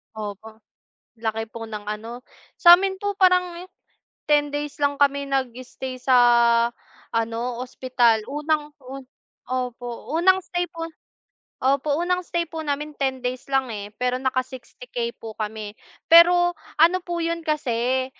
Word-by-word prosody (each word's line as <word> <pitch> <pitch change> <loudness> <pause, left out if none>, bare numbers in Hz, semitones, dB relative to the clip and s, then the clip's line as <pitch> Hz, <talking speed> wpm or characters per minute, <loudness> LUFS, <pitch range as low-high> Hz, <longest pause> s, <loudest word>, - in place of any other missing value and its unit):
Opo. 215 +1 -8 0.6
Laki 225 0 -2
po 225 -1 -7
ng 210 -1 -7
ano 230 +4 -7 0.3
sa 350 0 +8
amin 385 0 -1
po 405 +1 -2
parang 360 -1 +2 0.6
10 295 -1 +3
days 290 0 -5
lang 285 0 +1
kami 280 0 +1
nag-stay 255 -1 -4
sa 255 0 +3 1.0
ano, 230 0 -1 0.2
ospital. 245 -3 +1
Unang 300 +1 -1
taon 265 +1 -9 0.4
opo, 245 -1 -4
unang 375 +2 +4
stay 355 -1 -2
po 330 0 -6 0.7
opo, 280 +3 +1
unang 360 +1 0
stay 340 -1 -2
po 320 0 -6
namin 295 0 -3
10 265 -2 -1
days 250 0 -3
lang, 270 -1 +2
eh, 205 0 -7
pero 250 0 0
naka-60k 255 -2 -4
po 225 -1 -8
kami. 215 -1 -5 0.3
Pero, 350 +1 +6 0.2
ano 340 +4 +5
po 345 -1 -4
'yon 335 0 -2
kasi, 260 -4 0
270 Hz, 135 wpm, -23 LUFS, 240-330 Hz, 1.0 s, sa